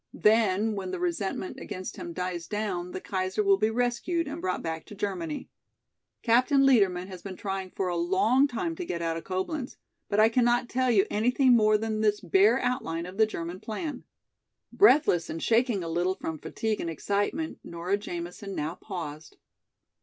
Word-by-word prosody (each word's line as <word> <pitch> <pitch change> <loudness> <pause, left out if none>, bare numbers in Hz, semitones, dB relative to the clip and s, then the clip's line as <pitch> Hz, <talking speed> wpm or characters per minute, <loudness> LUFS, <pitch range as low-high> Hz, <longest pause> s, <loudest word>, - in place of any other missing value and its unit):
Then, 215 -1 +3
when 195 -2 -4
the - - -4
resentment 225 - -2
against 185 0 -6
him 175 - -6
dies 175 -1 -4
down 200 -4 -3
the 180 - -5
Kaiser 185 +2 -1
will 195 -1 +4
be 215 +1 +3
rescued 245 +9 0
and 285 - -5
brought 185 -1 -2
back 160 -1 -3
to 210 - -11
Germany. 180 -6 -3 0.8
Captain 255 +4 +4
Liedermann 195 -9 +3
has 185 -2 -9
been 195 -2 -7
trying 195 -1 -4
for 190 0 -3
a 175 - -1
long 190 +11 +3
time 285 +6 -3
to 365 - -3
get 170 - -4
out 165 0 -1
of 165 - -5
Coblenz. 220 +9 -3 0.3
But 205 0 +1
I 215 - +7
cannot 240 +1 +2
tell 255 0 +1
you 210 -4 +4
anything 250 +4 +4
more 215 -2 +4
than 220 0 -2
this 210 -1 +2
bare 200 +6 +4
outline 225 -10 -2
of 185 +2 -9
the 220 - +6
German 175 -3 -5
plan." 260 - -5 0.7
Breathless 295 - +5
and 165 - -4
shaking 225 -1 +2
a - - -4
little 175 +3 0
from 160 -4 -5
fatigue 220 +6 -2
and 170 - -3
excitement, 205 - -2
Nora 170 +3 -2
Jamison 180 0 -6
now 150 +2 -2
paused. 165 -5 -7
200 Hz, 180 wpm, -28 LUFS, 180-235 Hz, 0.8 s, I